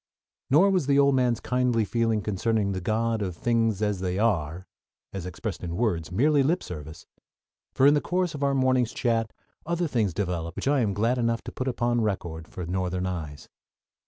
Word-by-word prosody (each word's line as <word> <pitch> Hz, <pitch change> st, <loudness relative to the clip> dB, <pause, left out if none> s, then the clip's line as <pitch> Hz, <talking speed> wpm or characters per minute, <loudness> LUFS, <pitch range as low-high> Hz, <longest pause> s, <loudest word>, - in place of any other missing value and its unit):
Nor 180 Hz, +9 st, +5 dB
was 180 Hz, -8 st, +1 dB
the 140 Hz, -1 st, +3 dB
old 140 Hz, 0 st, +5 dB
man's 125 Hz, -3 st, +2 dB
kindly 125 Hz, -3 st, +1 dB
feeling 115 Hz, -1 st, 0 dB
concerning 105 Hz, 0 st, 0 dB
the 95 Hz, -1 st, -3 dB
God 110 Hz, +3 st, 0 dB
of 90 Hz, -4 st, -3 dB
Things 115 Hz, -1 st, +1 dB
as 105 Hz, -3 st, 0 dB
They 90 Hz, 0 st, -2 dB
Are, 90 Hz, -5 st, 0 dB, 0.5 s
as 95 Hz, -2 st, -5 dB
expressed 90 Hz, +1 st, -5 dB
in 85 Hz, -1 st, -4 dB
words, 90 Hz, -7 st, -1 dB
mere 130 Hz, +12 st, +3 dB
lip 150 Hz, +5 st, +2 dB
service; 80 Hz, -2 st, -8 dB, 0.7 s
for 135 Hz, -, +4 dB
in 145 Hz, -, +7 dB
the 145 Hz, -, +2 dB
course 180 Hz, -1 st, -1 dB
of 145 Hz, -, -6 dB
our 140 Hz, -1 st, +2 dB
morning's 130 Hz, -3 st, +2 dB
chat 115 Hz, -2 st, 0 dB, 0.3 s
other 170 Hz, +1 st, -1 dB
things 110 Hz, -, 0 dB
developed 85 Hz, -4 st, -2 dB
which -, -, -4 dB
I 140 Hz, 0 st, +3 dB
am 105 Hz, -5 st, 0 dB
glad 115 Hz, +4 st, +1 dB
enough 115 Hz, -1 st, 0 dB
to -, -, -7 dB
put 130 Hz, -, -4 dB
upon 120 Hz, -1 st, 0 dB
record 85 Hz, -6 st, -3 dB
for 90 Hz, -, -7 dB
Northern 90 Hz, +1 st, -2 dB
eyes. 80 Hz, -6 st, -5 dB
115 Hz, 190 wpm, -26 LUFS, 90-130 Hz, 0.7 s, in